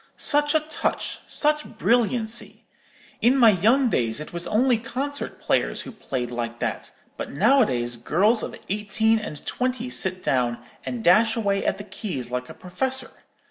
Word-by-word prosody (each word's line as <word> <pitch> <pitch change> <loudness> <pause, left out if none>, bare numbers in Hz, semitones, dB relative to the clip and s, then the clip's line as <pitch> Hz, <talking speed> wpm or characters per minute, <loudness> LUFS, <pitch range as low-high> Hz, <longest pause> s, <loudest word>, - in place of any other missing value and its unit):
Such 295 0 +3
a 315 - +4
touch, 310 +1 -2
such 300 0 +1
brilliancy! 235 -1 +1 0.6
In 250 +4 +4
my 235 -4 +7
young 230 +8 +3
days 115 - 0
it 150 - -8
was 170 0 -4
only 240 +1 +2
concert 270 +4 -4
players - - 0
who - - -8
played 130 - -4
like 120 -1 -4
that; - - -3 0.3
but - - -5
nowadays 140 - +2
girls 200 - +2
of - - -5
eighteen 210 +2 +1
and 180 -9 -8
twenty 250 0 -2
sit 185 -5 0
down, 120 -2 +1 0.3
and 240 -2 -4
dash 220 +5 +5
away 200 -3 0
at - - 0
the 205 - -7
keys 180 - -6
like 125 0 -3
a - - -10
professor. 260 +8 -3
220 Hz, 160 wpm, -24 LUFS, 165-250 Hz, 0.6 s, my